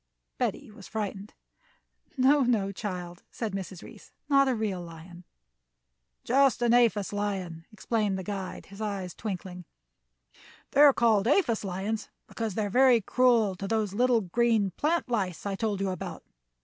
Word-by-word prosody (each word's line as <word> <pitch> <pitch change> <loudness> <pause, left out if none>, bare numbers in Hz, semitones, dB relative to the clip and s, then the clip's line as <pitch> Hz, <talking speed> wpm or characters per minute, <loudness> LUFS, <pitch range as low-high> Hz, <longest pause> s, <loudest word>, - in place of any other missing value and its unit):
Betty - - -2
was 205 -3 -13
frightened. 205 -2 -5 0.8
"No, 275 +3 +5
no, 225 -6 +1
child," 180 -4 -6
said 225 -4 -4
Mrs. 190 -2 -6
Reece, - - -14 0.2
"not 275 -1 +5
a 260 - +1
real 210 -5 -2
lion." 170 +1 -11 1.0
"Just 270 -1 +3
an 235 -1 +3
aphis 220 -5 +3
lion," 190 -5 -3
explained 215 -2 -1
the 190 - -5
guide, 195 -1 -5
his 200 +2 -12
eyes 195 -4 -3
twinkling. 180 -4 -6 1.1
"They 285 - +4
are 295 -1 +9
called 225 -5 +2
aphis 250 - +2
lions 200 +3 -3 0.2
because 225 -4 -4
they 215 - 0
are - - -3
very 255 0 +5
cruel 230 -2 +3
to 195 - -5
the 225 - +1
little 225 +3 +2
green 215 +1 +1
plant 315 - 0
lice 200 -8 -2
I 200 - -2
told 210 -1 -2
you 195 -1 -1
about. 185 - -6
210 Hz, 155 wpm, -28 LUFS, 190-235 Hz, 1.1 s, are